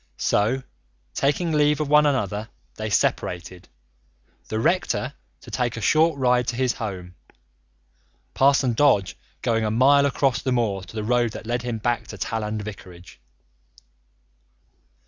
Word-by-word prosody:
So, 125 +6 +1 0.5
taking 150 +5 0
leave 150 -1 +2
of 150 - -1
one 150 +1 +5
another, 105 -5 -1 0.2
they 110 0 -5
separated, 90 -2 -1 0.8
the 110 - -2
rector - - 0 0.3
to - - -13
take 120 -2 -1
a - - -3
short 155 +5 +3
ride 125 -2 +2
to 120 - -1
his 130 0 +1
home, 95 -6 -6 1.2
Parson 135 -2 +3
Dodge 105 -7 +2 0.3
going 115 -1 +1
a 110 - 0
mile 140 +5 +4
across 135 -1 0
the 130 - -2
moor 110 -6 0
to 95 - -13
the 110 - -3
road 120 0 +1
that - - -8
led 120 +1 -1
him 120 -2 -3
back 120 +2 -1
to - - -9
Talland 110 -1 -3
vicarage. 90 -8 -11
120 Hz, 145 wpm, -23 LUFS, 105-135 Hz, 1.2 s, one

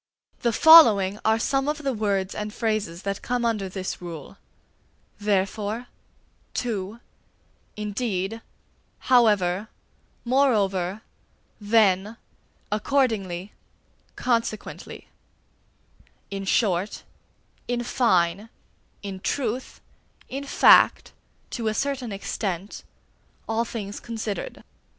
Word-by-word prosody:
The 235 - +1
following 215 - +7
are 220 0 +3
some 270 +4 0
of 300 0 -3
the 270 -1 0
words 200 -3 -1
and 210 0 -4
phrases 215 -6 -2
that 200 0 -3
come 245 -1 -1
under 215 -5 -1
this 185 -1 -5
rule: 165 -5 -8 0.8
therefore, 205 +3 -1 0.7
too, 220 -2 -3 0.8
indeed, 210 0 -3 0.7
however, 210 -5 +4 0.6
moreover, 210 -7 +1 0.6
then, 210 -1 +2 0.5
accordingly, 210 -6 0 0.6
consequently; 230 -3 -3 1.2
in 195 0 -4
short, 190 -1 0 0.6
in 240 0 -1
fine, 200 -5 +1 0.5
in 195 -2 -6
truth, 250 +3 -3 0.5
in 275 +2 -5
fact, - - +5 0.4
to 230 -3 -3
a 215 - 0
certain 270 -3 -2
extent, 195 -1 -4 0.6
all 225 +1 0
things 205 -3 -6
considered. 220 -3 -5
215 Hz, 90 wpm, -25 LUFS, 195-235 Hz, 1.2 s, following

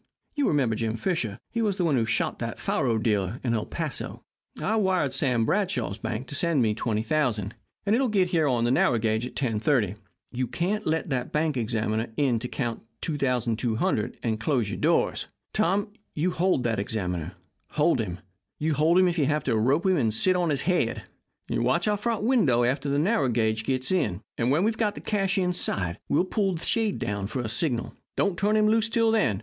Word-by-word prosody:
You 290 -3 +1
remember 130 -7 +2
Jim 115 0 -2
Fisher 175 - -1
he 230 - -1
was 205 -3 0
the 180 - +1
one 155 -4 +2
who 115 -3 +2
shot 110 - -1
that - - -4
faro 120 -4 0
dealer 110 0 0
in 120 -3 0
El 110 -2 -1
Paso. - - -4 0.4
I 220 - 0
wired 185 -9 +1
Sam 125 -6 +1
Bradshaw's 130 - 0
bank 110 +2 -3
to - - -6
send 155 -3 +2
me 110 -2 +2
$20,000, 110 -1 0 0.3
and 205 +2 +3
it 250 - +2
will 265 - +2
get 190 -5 +1
in 165 -2 +3
on 125 -4 +1
the 120 - +2
narrow 125 -2 +3
gauge 110 +2 0
at - - -12
10.35. 115 -4 +1 0.3
You 125 0 -2
can't 195 - -2
let 160 -1 0
a 125 -1 -1
bank 155 -1 0
examiner 110 -1 -1
in 130 -6 +2
to 125 - -4
count 120 -3 -3 0.2
$2,200 120 -7 0
and 110 -2 -1
close 115 -3 0
your - - -4
doors. - - +1 0.3
Tom, 200 +4 +1 0.2
you 170 +4 +1
hold 175 -6 +1
that 115 -3 0
examiner. 90 -5 -3 0.4
Hold 150 -2 +3
him. 90 -3 -5 0.5
Hold 155 +4 +3
him 185 0 +5
if 175 -1 0
you 140 - +2
have 150 -1 0
to - - +1
rope 135 - +2
him 190 -1 +3
and 115 -6 +2
sit 185 - +3
on 175 -2 +1
his 145 -3 0
head. 175 -10 0 0.4
Watch 130 - +1
our 210 - +3
front 220 0 -1
window 190 - +3
after 135 +3 0
the 140 - +1
narrow 150 - +2
gauge 110 -1 0
gets 130 +2 -1
in, 110 - 0
and 120 +1 0
when 150 +7 +3
we've 220 +1 0
got 210 -3 +1
the - - -6
cash 195 -3 0
inside 175 - -1
we'll - - +3
pull 195 0 0
down - - -3
the 160 - -7
shade 105 - -1
for 130 - -2
a 120 - -3
signal. 120 +1 -1 0.2
Don't 200 -3 +1
turn 205 +4 +2
him 215 0 +4
loose 225 +1 +2
till 230 -1 +2
then. 130 - +2
135 Hz, 205 wpm, -26 LUFS, 115-185 Hz, 0.5 s, him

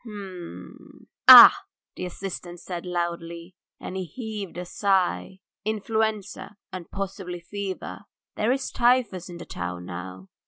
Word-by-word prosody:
"H - - -14
m... 185 - -10 0.2
Ah!.. - - +12 0.2
." - - -68
the 180 - -4
assistant 175 -1 -7
said 175 0 -7
slowly, 170 0 -4 0.3
and - - -7
he 190 -1 -3
heaved 210 - -7
a 180 - -5
sigh. 185 - 0 0.2
"Influenza 215 -1 -2 0.2
and 180 -2 -7
possibly 190 -2 -5
fever. 195 +2 -6 0.3
There's 255 +5 0
typhus 235 -7 +1
in 175 - -8
the 175 - -9
town 90 0 -6
now. 95 +1 -8
185 Hz, 130 wpm, -25 LUFS, 170-205 Hz, 0.3 s, Ah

